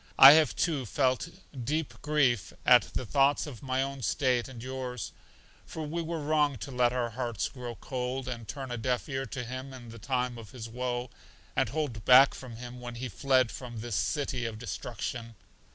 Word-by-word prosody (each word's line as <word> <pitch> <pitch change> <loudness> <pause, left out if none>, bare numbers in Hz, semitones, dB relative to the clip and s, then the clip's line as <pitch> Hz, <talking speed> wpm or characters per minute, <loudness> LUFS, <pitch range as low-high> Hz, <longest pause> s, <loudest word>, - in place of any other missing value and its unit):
I 135 - +12
have, 155 0 +5
too, 145 -8 0
felt 130 +5 +1 0.3
deep 150 0 -1
grief 135 -8 +2
at - - +6
the 130 - -1
thoughts 140 +4 +3
of 135 -7 -9
my 130 0 0
own 140 0 -5
state 125 +2 +1
and 120 -3 -9
yours; 130 -3 -4 0.5
for 160 - -6
we 165 +3 -2
were 165 0 -3
wrong 150 -2 +2
to 135 +6 -7
let 125 -1 +3
our 120 -2 -1
hearts 120 -2 -2
grow 125 -2 -7
cold, 125 +4 -4
and 115 -3 -5
turn 135 -3 -6
a 120 - -2
deaf 125 +4 -1
ear 135 -2 -3
to 125 +2 -4
him 130 +3 -6
in 120 -3 -10
the 115 +1 -10
time 125 0 -1
of 110 -3 -12
his 115 -3 -6
woe, 125 +1 -3 0.4
and - - +2
hold 135 -6 -3
back 130 +3 +8
from 125 -3 -9
him 125 +1 -8
when 120 -1 -6
he 125 +1 -4
fled 130 +3 +2
from 120 -2 -7
this 120 -2 -3
City 135 -1 -1
of 115 -2 -4
Destruction. 115 0 -5
125 Hz, 195 wpm, -30 LUFS, 120-135 Hz, 0.5 s, I